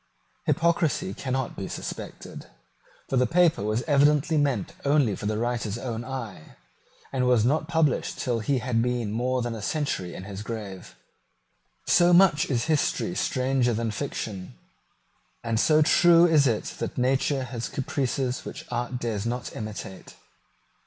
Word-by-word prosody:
Hypocrisy 165 - +1
cannot 130 +2 -3
be 95 - -5
suspected: - - -7 0.6
for 135 - 0
the 125 0 +3
paper 170 - +3
was 110 +4 -1
evidently 150 +1 +3
meant 145 -4 0
only 140 -7 +2
for 105 - -5
the 105 0 -1
writer's 115 -2 -2
own 120 -2 -4
eye, 120 -11 -7 0.6
and 130 -2 +1
was 120 -3 +4
not 155 +4 +1
published 160 -4 +1
till 120 -2 -1
he 135 +5 0
had 125 -2 0
been 120 -3 -1
more 125 +3 0
than 120 -1 -3
a 110 - -6
century 105 - -2
in - - -7
his 100 0 -7
grave. 105 -5 -7 0.9
So 175 0 +5
much 175 -3 +5
is 120 -4 0
history 155 +2 0
stranger 130 -6 +1
than 115 0 -1
fiction; 105 - -5 0.9
and 115 -1 0
so 155 +3 +4
true 170 +2 +6
is 155 -5 +4
it 110 -4 0 0.2
that - - -4
nature 130 +2 +1
has 120 -2 -5
caprices 130 -1 -2
which - - -8
art 120 +1 -2
dares 115 -3 -3
not 125 +1 -4
imitate. 105 -3 -7
125 Hz, 150 wpm, -26 LUFS, 115-145 Hz, 0.9 s, true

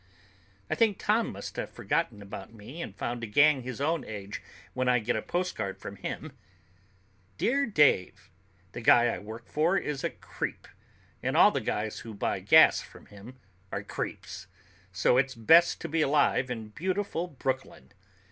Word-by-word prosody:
I - - -1
think 220 -4 +2
Tom 220 +2 +1
must 100 0 -8
have - - -3
forgotten 105 - -2
about 100 - -9
me 115 +9 -10
and 100 - -7
found 120 0 -4
a - - -3
gang 145 +5 +4
his 125 0 -6
own 155 +2 0
age 100 -1 -7 0.3
when 130 0 0
I 125 - +4
get 120 +1 -1
a 110 - -1
postcard 175 - -3
from 100 0 -9
him: 150 +10 -6 1.1
"Dear 280 - +1
Dave, 150 - +2 0.4
The 120 - -7
guy 120 +1 +6
I 105 - -3
work 110 +4 -10
for 165 +6 +1
is 150 -7 -3
a - - +1
creep, - - -6 0.5
and - - -1
all - - +7
the - - -2
guys 105 0 -3
who 110 -2 -9
buy - - -1
gas - - +6
from - - -14
him 110 +6 -12 0.3
are - - -3
creeps, 95 -2 -6 0.4
so 95 +7 +3
it's 130 -1 0
great 160 +10 +5
to - - -4
be 160 +1 0
alive 140 -3 +2
in 110 -3 -5
Beautiful 185 - -2
Brooklyn! 130 - -4
125 Hz, 170 wpm, -28 LUFS, 105-160 Hz, 1.1 s, all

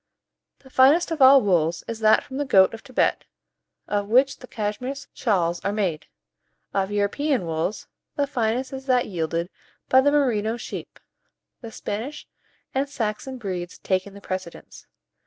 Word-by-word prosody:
The 265 - -19
finest 290 +8 +5
of 320 -3 -2
all 265 0 +8
wools 170 -4 +1
is 230 -1 -5
that 220 0 +4
from 265 -2 -8
the 290 - 0
goat 195 -8 +5
of 225 - -8
Thibet, 255 -3 0 0.6
of 205 -1 -1
which 260 +5 +3
the 250 - -12
Cashmere 220 +5 -3 0.2
shawls 175 -7 0
are 200 - 0
made. 185 -7 -2 0.7
Of 195 -1 0
European 205 - 0
wools, 165 +5 -2 0.3
the 285 - +1
finest 250 0 -1
is 265 0 -7
that 250 -2 +3
yielded 170 -1 -3 0.4
by 260 - +6
the 285 +2 +3
Merino 235 -6 +1
sheep, 240 - -8 0.6
the 230 -3 -8
Spanish 225 +8 -5 0.5
and 275 +1 0
Saxon 250 +1 -3
breeds 180 -6 -5
taking 190 +1 -2
the 200 - -11
precedence. 185 -3 -7
220 Hz, 155 wpm, -24 LUFS, 195-265 Hz, 0.7 s, all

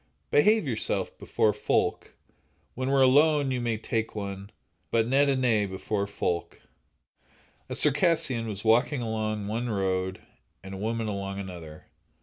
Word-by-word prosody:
Behave 210 +6 +4
yoursel' 115 -4 -1
before - - +1
folk, - - -1 0.6
When 130 +1 -3
we're 135 -1 +4
alone, 145 +1 +4
ye 125 - -1
may 120 -2 -1
tak' 110 0 -3
one, 100 -1 -6 0.4
But 115 -1 +1
nent 140 +3 +3
a - - +3
ane 105 -4 +2
before 100 +2 -3
folk. 90 -4 -3 1.1
A - - -3
Circassian 145 -5 +3
was 105 0 -6
walking 120 +4 +3
along 110 -2 -2
one 115 +3 -2
road, 95 -2 -1 0.4
and 95 0 -8
a - - -6
woman 115 +1 -2
along 100 -1 -4
another. 85 -5 -9
110 Hz, 140 wpm, -27 LUFS, 100-130 Hz, 1.1 s, Behave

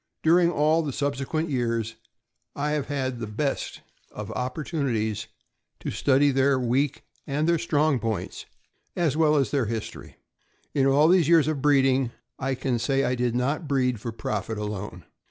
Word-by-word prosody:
During 170 +2 +5
all 155 0 +2
the 150 -3 -3
subsequent 145 +4 -2
years, 115 -3 -1 0.6
I 150 +1 -1
have 150 -2 -1
had 130 -4 -2
the 115 - -4
best 135 +7 -3 0.3
of 105 0 -7
opportunities 125 - -2 0.5
to - - -4
study 140 +1 +3
their 135 0 +3
weak 130 +3 0 0.2
and 150 +2 0
their 170 -1 +3
strong 150 -3 +1
points, 110 -5 -4 0.5
as 165 -6 +1
well 155 -1 +3
as 135 -7 +1
their 130 -6 +1
history. 115 0 -6 0.6
In 135 -1 +3
all 145 +3 +5
these 175 -3 +4
years 165 -4 +5
of 155 -3 -1
breeding,* 135 -3 +3 0.3
I 135 0 -1
can 125 -2 -1
say 135 +3 +1
I 125 - +1
did 120 -1 0
not 140 +6 -1
breed 130 -4 +1
for 115 +3 -5
profit 110 -1 -3
alone. 105 -4 -5
135 Hz, 160 wpm, -25 LUFS, 120-150 Hz, 0.6 s, During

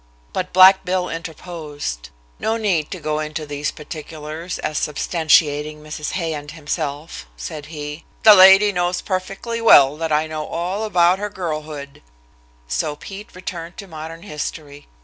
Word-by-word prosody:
But 185 0 -3
Black 190 +1 +8
Bill 180 0 -1
interposed. 155 - -6 0.3
No 225 +1 0
need 185 -9 0
to 185 - -6
go 155 -1 -2
into 155 +1 -4
these 145 0 -3
particulars, 155 +2 -7
as 155 - -2
substantiating 150 -1 +2
Mrs. 150 0 -5
Hay 165 -3 -1
and 145 -1 -6
himself, 150 - -5
said 145 - -7
he. 150 0 -7 0.2
"The 215 - +10
lady 195 +2 +8
knows 180 -1 0
perfectly 195 +5 -3
well 140 -11 +7
that 160 0 -2
I 155 +1 +2
know 155 -1 -5
all 185 +6 -2
about 180 -2 +3
her 210 0 -3
girlhood," 155 -6 -6 0.7
so - - -1
Pete 195 +6 -10
returned 175 -1 -7
to 200 - -7
modern 165 -1 -8
history. 150 -4 -6
160 Hz, 150 wpm, -21 LUFS, 150-185 Hz, 0.7 s, The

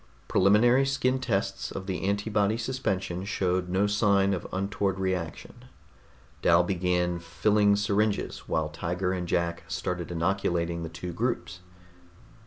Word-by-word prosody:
Preliminary 115 +7 +4
skin 130 -1 +1
tests 100 -6 -1
of 95 - -6
the 95 -3 -3
antibody 105 +1 +1
suspension 100 -7 -2
showed 90 -2 -1
no 95 +3 +2
sign 100 -1 +3
of 90 - -4
untoward 100 0 -1
reaction. 95 -4 -4 0.8
Dal 85 +1 +5
began 90 -1 0
filling 100 +5 +2
syringes 105 +1 -1
while 80 -1 0
Tiger 90 +4 -2
and 90 -2 -3
Jack 85 0 0
started 90 -2 -3
inoculating 85 -1 -1
the 85 - -5
two 85 +2 -6
groups. 115 -4 -2
95 Hz, 125 wpm, -27 LUFS, 90-105 Hz, 0.8 s, Dal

